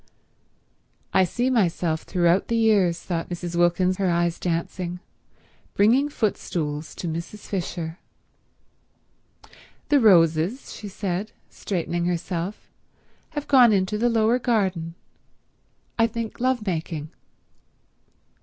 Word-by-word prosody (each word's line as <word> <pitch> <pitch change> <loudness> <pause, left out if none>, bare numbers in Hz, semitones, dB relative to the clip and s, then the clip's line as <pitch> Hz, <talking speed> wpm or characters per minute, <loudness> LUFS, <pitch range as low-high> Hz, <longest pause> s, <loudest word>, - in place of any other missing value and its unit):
"I 190 - +5
see 245 +8 -1
myself 170 -8 +1
throughout 175 0 +1
the 230 - 0
years," 200 -7 +3
thought 170 -2 -4
Mrs. 175 -1 -5
Wilkins, 175 +2 +2
her 195 -2 +1
eyes 170 0 0
dancing, 175 +1 -3 0.8
"bringing 245 +8 +4
footstools 160 - -2
to 175 - -5
Mrs. 170 +6 -6
Fisher.. 175 -3 -4 0.8
." - - -27
"The 290 -1 +5
Roses," 175 - +3
she 210 - -8
said, 195 +1 -4 0.2
straightening 175 -2 -2
herself, 175 +2 -3 0.7
"have 295 - -3
gone 250 -4 +7
into 200 +1 +1
the 240 +2 +3
lower 230 +1 +2
garden—I 190 +1 -3
think 230 -1 -5
lovemaking." 180 - -2
185 Hz, 105 wpm, -24 LUFS, 170-220 Hz, 0.8 s, gone